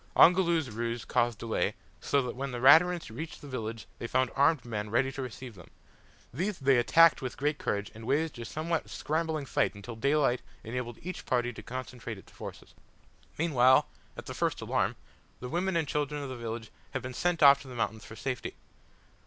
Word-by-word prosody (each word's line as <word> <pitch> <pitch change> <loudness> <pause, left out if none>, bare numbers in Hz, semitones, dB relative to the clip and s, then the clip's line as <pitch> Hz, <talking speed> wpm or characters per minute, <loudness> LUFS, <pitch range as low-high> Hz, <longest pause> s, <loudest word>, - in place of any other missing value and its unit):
Ongoloo's 170 -6 +5
ruse 115 +1 -3
caused 120 -2 +1
delay, 115 +1 -1 0.2
so 140 -1 +1
that 125 - -4
when 135 +2 -3
the 120 - -4
Raturans 160 +3 +6
reached 160 +5 -6
the 145 - -11
village 115 -4 -5
they 115 - -4
found 130 +1 +1
armed 140 -1 +3
men 105 -3 -4
ready 130 +5 +2
to 135 - -5
receive 125 -1 -7
them. 90 -4 -14 0.6
These 185 +8 -2
they 135 -2 +4
attacked 165 +7 +6
with 130 -2 -5
great 145 +2 0
courage, 100 0 -2
and 110 +1 -10
waged 145 0 0
a 115 - -5
somewhat 160 +5 -2
scrambling 155 -1 -2
fight 130 - 0
until 105 +3 -8
daylight 140 +1 +2 0.2
enabled 120 0 -4
each 185 +2 -6
party 120 -1 +1
to - - -9
concentrate 125 -3 -6
its 95 - -15
forces. - - -10 0.6
Meanwhile, 130 -5 +4 0.3
at - - -7
the - - -6
first - - -1
alarm, - - 0 0.4
the 125 - -6
women 180 +4 0
and 160 -3 0
children 145 0 -2
of 140 - -5
the 130 - -5
village 115 -1 -6 0.2
had - - -3
been 130 0 -5
sent 175 +4 +1
off 140 0 +8
to 140 - -12
the 125 - -9
mountains 110 -1 -2
for 110 - -10
safety. 125 +2 -4
130 Hz, 195 wpm, -30 LUFS, 120-150 Hz, 0.6 s, off